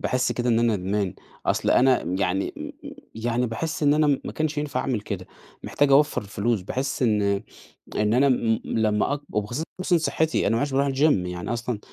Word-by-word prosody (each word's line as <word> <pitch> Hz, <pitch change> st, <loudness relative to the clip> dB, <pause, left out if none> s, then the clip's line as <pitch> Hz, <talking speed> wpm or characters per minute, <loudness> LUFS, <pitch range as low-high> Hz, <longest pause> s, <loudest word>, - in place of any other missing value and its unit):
باحس 125 Hz, 0 st, 0 dB
كده 120 Hz, 0 st, -2 dB
إن 115 Hz, -1 st, +3 dB
أنا 115 Hz, -3 st, +2 dB
ندمان 95 Hz, 0 st, -2 dB, 0.3 s
أصل -, -, +1 dB
أنا 130 Hz, 0 st, +4 dB, 0.2 s
يعني 95 Hz, 0 st, 0 dB
م -, -, -9 dB
م -, -, -6 dB, 0.2 s
يعني 120 Hz, +2 st, -1 dB
باحس 150 Hz, +8 st, -4 dB
إن 145 Hz, 0 st, +5 dB
أنا 155 Hz, 0 st, +3 dB, 0.2 s
ما -, -, -5 dB
كنش 155 Hz, -1 st, -1 dB
ينفع 145 Hz, -3 st, -2 dB
أعمل 125 Hz, -5 st, -1 dB
كده، 95 Hz, -3 st, -6 dB, 0.4 s
محتاج 145 Hz, -1 st, +1 dB
أوفَّر 145 Hz, -2 st, +4 dB
الفلوس، 105 Hz, +2 st, -1 dB
باحس 130 Hz, +8 st, -3 dB
إن 105 Hz, -3 st, +2 dB, 0.7 s
إن 105 Hz, +1 st, +2 dB
أنا 135 Hz, +3 st, +4 dB, 0.4 s
لما 110 Hz, +4 st, +1 dB
أق 145 Hz, -, -4 dB
وخصوصًا 155 Hz, -, -1 dB
صحتي، 160 Hz, 0 st, 0 dB
أنا 110 Hz, -, +2 dB
ما 115 Hz, -, +1 dB
عدتش 145 Hz, -1 st, -1 dB
باروح 140 Hz, +1 st, +2 dB
الجيم، 135 Hz, -8 st, +2 dB
يعني 90 Hz, +5 st, -4 dB
أصلًا 120 Hz, -1 st, -3 dB
120 Hz, 185 wpm, -24 LUFS, 105-145 Hz, 0.7 s, إن